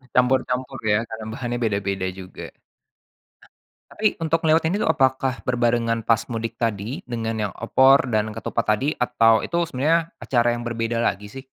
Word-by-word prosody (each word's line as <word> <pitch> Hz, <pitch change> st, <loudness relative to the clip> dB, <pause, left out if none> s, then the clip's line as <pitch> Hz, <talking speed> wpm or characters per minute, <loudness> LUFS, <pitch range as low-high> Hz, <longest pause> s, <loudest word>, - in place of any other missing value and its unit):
Campur-campur 125 Hz, 0 st, +1 dB
ya 110 Hz, +2 st, +2 dB
karena 110 Hz, -1 st, -7 dB
bahannya 120 Hz, -1 st, -3 dB
beda-beda 100 Hz, -3 st, -1 dB
juga. 95 Hz, 0 st, -9 dB, 1.4 s
Ah, -, -, -15 dB
tapi 215 Hz, 0 st, +1 dB
untuk 165 Hz, 0 st, 0 dB
ngeliwet 160 Hz, 0 st, +3 dB
ini 200 Hz, +5 st, -1 dB
tuh -, -, +1 dB
apakah 130 Hz, -3 st, +1 dB
berbarengan 120 Hz, -2 st, +1 dB
pas 115 Hz, -1 st, +2 dB
mudik 115 Hz, 0 st, -4 dB
tadi 115 Hz, +2 st, -3 dB
dengan 115 Hz, -2 st, -3 dB
yang -, -, -10 dB
opor 130 Hz, +3 st, +4 dB
dan 110 Hz, 0 st, 0 dB
ketupat 115 Hz, -, -2 dB
tadi 140 Hz, +7 st, -1 dB
atau 115 Hz, -3 st, +3 dB
itu 170 Hz, -, -3 dB
sebenarnya 165 Hz, +5 st, +1 dB
acara 120 Hz, -2 st, +1 dB
yang 120 Hz, -, -6 dB
berbeda 115 Hz, 0 st, -2 dB
lagi 105 Hz, -2 st, -1 dB
sih? 135 Hz, +2 st, -9 dB
120 Hz, 160 wpm, -23 LUFS, 115-130 Hz, 1.4 s, opor